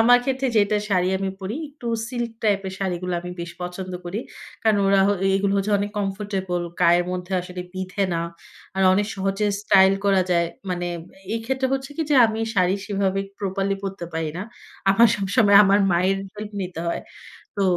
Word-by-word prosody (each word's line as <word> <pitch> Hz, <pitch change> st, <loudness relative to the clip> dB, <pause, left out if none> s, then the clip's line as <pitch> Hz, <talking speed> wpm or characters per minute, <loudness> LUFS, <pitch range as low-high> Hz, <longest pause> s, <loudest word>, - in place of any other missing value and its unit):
আমার 245 Hz, +2 st, +7 dB
ক্ষেত্রে 265 Hz, 0 st, 0 dB
যেটা, 210 Hz, 0 st, +3 dB
শাড়ি 185 Hz, -3 st, +2 dB
আমি 195 Hz, 0 st, -2 dB
পড়ি, 195 Hz, +7 st, -4 dB
একটু 280 Hz, -4 st, -11 dB, 0.2 s
সিল্ক 240 Hz, -2 st, -3 dB
টাইপের 200 Hz, -3 st, +1 dB
শাড়িগুলা 180 Hz, -2 st, -2 dB
আমি 180 Hz, -, -7 dB
বেশ 170 Hz, 0 st, -5 dB
পছন্দ 180 Hz, +1 st, -5 dB
করি। 190 Hz, +6 st, -3 dB, 0.4 s
কারণ 215 Hz, -2 st, +4 dB
ওরা 195 Hz, 0 st, +4 dB
হ -, -, +3 dB, 0.3 s
এগুলো 195 Hz, 0 st, +1 dB
হচ্ছে 200 Hz, +2 st, 0 dB
অনেক 205 Hz, +1 st, -2 dB
কমফোর্টেবল, 195 Hz, -3 st, -2 dB, 0.2 s
গায়ের 175 Hz, 0 st, +5 dB
মধ্যে 180 Hz, +1 st, -5 dB
আসলে 180 Hz, 0 st, -7 dB
বিঁধে 185 Hz, +1 st, -3 dB
না। 165 Hz, -, 0 dB, 0.6 s
আর 190 Hz, -, +2 dB
অনেক 205 Hz, +1 st, +1 dB
সহজে 195 Hz, +2 st, -1 dB, 0.2 s
স্টাইল 195 Hz, -2 st, +6 dB
করা 195 Hz, -2 st, +4 dB
যায়। 170 Hz, -1 st, +3 dB, 0.2 s
মানে, 175 Hz, 0 st, -2 dB, 0.5 s
এই 230 Hz, -, -2 dB
ক্ষেত্রে 265 Hz, +2 st, 0 dB
হচ্ছে 270 Hz, +1 st, -4 dB
কি 325 Hz, -, 0 dB
যে, -, -, +4 dB
আমি 220 Hz, 0 st, -3 dB
শাড়ি 185 Hz, -1 st, +3 dB
সেভাবে 195 Hz, -1 st, 0 dB, 0.2 s
প্রপারলি 195 Hz, 0 st, -1 dB
পড়তে 195 Hz, -2 st, -5 dB
পারি 160 Hz, -1 st, -1 dB
না। 185 Hz, -, -3 dB, 0.5 s
আমার 230 Hz, +4 st, +6 dB
সবসময় 200 Hz, 0 st, +4 dB
আমার 200 Hz, +1 st, +4 dB
মায়ের 185 Hz, +3 st, +2 dB, 0.2 s
হেল্প 210 Hz, 0 st, -7 dB
নিতে 180 Hz, -3 st, -5 dB
হয় 170 Hz, -, -2 dB, 0.6 s
তো 200 Hz, -, +2 dB
195 Hz, 180 wpm, -23 LUFS, 185-210 Hz, 0.6 s, আমার